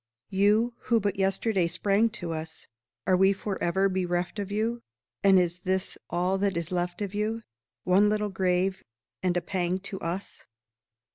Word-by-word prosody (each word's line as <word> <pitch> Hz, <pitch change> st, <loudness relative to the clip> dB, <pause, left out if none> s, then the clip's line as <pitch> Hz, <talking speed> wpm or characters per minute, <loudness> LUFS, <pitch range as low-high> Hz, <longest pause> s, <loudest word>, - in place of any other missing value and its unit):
You 210 Hz, +5 st, +3 dB
who 230 Hz, -1 st, +3 dB
but 200 Hz, -2 st, -1 dB
yesterday 195 Hz, -1 st, +1 dB
sprang 205 Hz, +6 st, +2 dB, 0.2 s
to 165 Hz, -, -2 dB
us, 160 Hz, 0 st, -6 dB, 0.4 s
Are 185 Hz, -, +4 dB
we 190 Hz, +2 st, +5 dB
forever 195 Hz, -1 st, 0 dB
bereft 180 Hz, +1 st, -1 dB
of 200 Hz, -1 st, -4 dB
you? 225 Hz, +3 st, -1 dB, 0.4 s
And 195 Hz, -1 st, +6 dB
is 175 Hz, -1 st, +1 dB
this 185 Hz, +1 st, -1 dB
all 180 Hz, +2 st, 0 dB
that 195 Hz, -2 st, +1 dB
is 170 Hz, +1 st, -3 dB
left 180 Hz, +2 st, -2 dB
of 200 Hz, -1 st, -5 dB
you 220 Hz, +2 st, -2 dB, 0.4 s
One 195 Hz, +3 st, +4 dB
little 210 Hz, 0 st, 0 dB
grave, 190 Hz, 0 st, 0 dB, 0.4 s
and 180 Hz, -1 st, +1 dB
a -, -, +1 dB
pang 180 Hz, -1 st, -1 dB
to 195 Hz, -1 st, -5 dB
us? 175 Hz, +4 st, -5 dB
190 Hz, 160 wpm, -27 LUFS, 180-205 Hz, 0.4 s, And